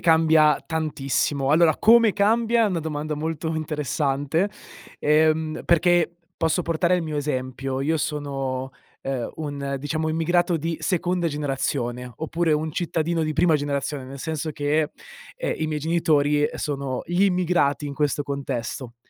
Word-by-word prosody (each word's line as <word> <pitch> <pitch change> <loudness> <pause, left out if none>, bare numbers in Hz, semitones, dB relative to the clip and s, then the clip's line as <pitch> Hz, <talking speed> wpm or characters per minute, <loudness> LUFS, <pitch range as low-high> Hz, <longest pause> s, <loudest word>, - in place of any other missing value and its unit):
cambia 160 -2 +4
tantissimo. 145 -3 -1
Allora, 160 0 +5
come 230 -1 +6
cambia 225 +3 +3
è - - +3
una 180 - -1
domanda 155 -1 -3
molto 160 +1 -3
interessante, 150 +2 -1 0.5
ehm, 155 +1 +2
perché 175 0 +3 0.2
posso 165 +2 +1
portare 170 +1 +1
il 180 - -1
mio 155 -2 -4
esempio: 130 -2 -3
io 155 +4 +1
sono, 135 -4 -3 0.3
ehm, 130 -3 -3
un, 140 -3 -4
diciamo, 155 +3 -1
immigrato 175 +1 +1
di 165 +1 -2
seconda 175 +1 0
generazione 135 -4 -2
oppure 160 +2 0
un 155 +1 0
cittadino 165 0 -1
di 155 - -1
prima 160 0 +3
generazione, 140 -1 -3
nel 135 +1 -9
senso 155 +2 -3
che, 150 +1 0 0.5
ehm, - - -2
i 160 - -2
miei 155 -1 -2
genitori 150 -2 +2
sono 140 -3 -3
gli 175 +3 +1
immigrati 175 -6 +1
in 140 - -5
questo 145 0 0
contesto. 130 -3 -4
155 Hz, 140 wpm, -24 LUFS, 140-165 Hz, 0.5 s, come